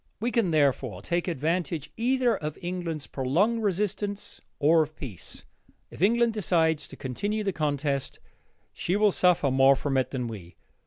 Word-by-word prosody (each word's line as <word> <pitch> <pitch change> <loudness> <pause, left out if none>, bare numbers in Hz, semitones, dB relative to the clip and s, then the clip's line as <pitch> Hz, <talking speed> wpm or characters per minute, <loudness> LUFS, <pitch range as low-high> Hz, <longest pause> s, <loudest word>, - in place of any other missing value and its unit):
We 235 +3 -1
can, 230 -7 +2
therefore, 135 - +1
take 175 +1 -1
advantage 165 -1 -2
either 245 0 +2
of 155 -4 -5
England's 175 -4 -4
prolonged 180 - +1
resistance 205 0 -2 0.2
or 160 +2 +4
of 155 0 -3
peace. 115 - -7 0.5
If - - -11
England 235 +3 +3
decides 160 -7 +1
to - - -11
continue 205 - -3
the 195 -2 -1
contest, 145 -3 -1 0.5
she 180 - -1
will 210 0 +4
suffer 180 -7 +3
more 135 +1 +6
from 135 0 -1
it 130 - +1
than 125 -3 -3
we. 95 -7 -9
165 Hz, 155 wpm, -27 LUFS, 140-205 Hz, 0.5 s, more